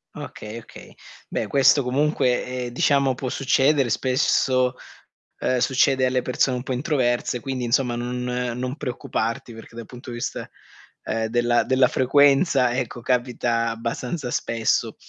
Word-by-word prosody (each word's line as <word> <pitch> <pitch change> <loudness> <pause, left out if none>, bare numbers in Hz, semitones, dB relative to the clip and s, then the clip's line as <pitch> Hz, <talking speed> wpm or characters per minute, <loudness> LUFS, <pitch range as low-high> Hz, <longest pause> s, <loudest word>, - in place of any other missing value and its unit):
Okay, 105 +2 -8
okay. 115 - -13 0.3
Beh, - - -2
questo 135 +1 +4
comunque, 130 -1 +1 0.2
ehm, - - -4
diciamo 135 +2 +2
può 130 +1 -5
succedere. 135 0 +2
Spesso, 130 +1 +1 0.7
ehm, 130 - 0
succede 130 +1 +2
alle 130 0 +1
persone 125 +1 0
un 125 - -6
po' 130 - -6
introverse, 125 -3 0
quindi 130 -1 -3
insomma 120 +1 +1
non 125 +1 -4
non 125 +1 -3
preoccuparti, 120 -4 -3
perché 115 +1 -13
dal 115 -1 -7
punto 125 +2 -11
di 120 - -6
vista, 120 - -5 0.5
ehm, 115 0 -2
della 120 +1 +2
della 130 0 +4
frequenza, 135 0 +3
ecco, 125 -1 -4
capita 120 -2 0
abbastanza 120 +4 -4
spesso. 115 -2 0
125 Hz, 140 wpm, -23 LUFS, 120-130 Hz, 0.7 s, questo